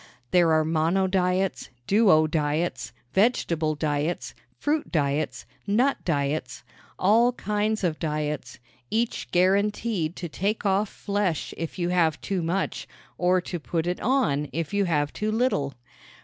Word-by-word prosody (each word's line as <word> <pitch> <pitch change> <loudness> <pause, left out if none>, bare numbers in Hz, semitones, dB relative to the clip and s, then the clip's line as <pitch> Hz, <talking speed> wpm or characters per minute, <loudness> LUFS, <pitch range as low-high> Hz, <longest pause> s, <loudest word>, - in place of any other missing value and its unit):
There 175 -2 +4
are 155 0 +3
monodiets, 180 +3 +1 0.2
duodiets, 155 -5 +2 0.2
vegetable 170 -7 +2
diets, 150 +2 -2 0.2
fruit 295 +1 -1
diets, 150 -1 -1 0.2
nut 245 +7 +2
diets 140 -6 -2 0.3
all 230 +6 +4
kinds 210 -1 -1
of 165 -4 0
diets 150 -5 -3 0.3
each 230 +1 -1
guaranteed 195 -1 +1
to 175 - -5
take 200 +7 -2
off 195 +1 +2
flesh 200 -6 -2
if 165 -1 -5
you 175 -1 -1
have 165 -4 +2
too 195 -3 -2
much 175 +4 -2 0.3
or 180 +1 +3
to 175 0 -5
put 160 +1 -2
it 180 +1 -1
on 215 - +1
if 165 +1 -3
you 200 -1 +2
have 145 -4 0
too 215 +1 -2
little. 215 - 0
180 Hz, 130 wpm, -26 LUFS, 155-205 Hz, 0.3 s, There